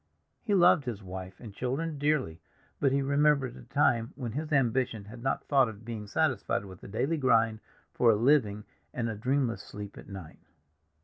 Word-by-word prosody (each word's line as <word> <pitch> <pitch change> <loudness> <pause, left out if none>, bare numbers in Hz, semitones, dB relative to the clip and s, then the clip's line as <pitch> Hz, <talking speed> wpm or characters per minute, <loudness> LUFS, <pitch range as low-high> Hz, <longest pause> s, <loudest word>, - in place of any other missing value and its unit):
He 210 -4 0
loved 175 -5 +5
his 110 -5 -5
wife 95 0 -8
and 110 -4 -10
children 140 +7 -3
dearly, 145 - 0 0.4
but 135 - +3
he 140 0 +1
remembered 140 -2 +2
a - - -11
time 120 -5 +2
when 120 -4 -5
his 150 +6 -4
ambition 125 -5 +1
had 115 +3 -11
not 135 - -1
thought 135 -4 +3
of 110 0 -11
being 110 -3 -6
satisfied 100 - 0
with 95 -2 -12
the - - -10
daily 135 +11 -1
grind 115 -5 +3 0.3
for 120 - +4
a 110 - +6
living 110 -3 +2 0.3
and 120 -2 -1
a 110 - -3
dreamless 125 +1 0
sleep 105 -1 -9
at - - -13
night. 95 -5 -9
120 Hz, 185 wpm, -29 LUFS, 105-140 Hz, 0.4 s, a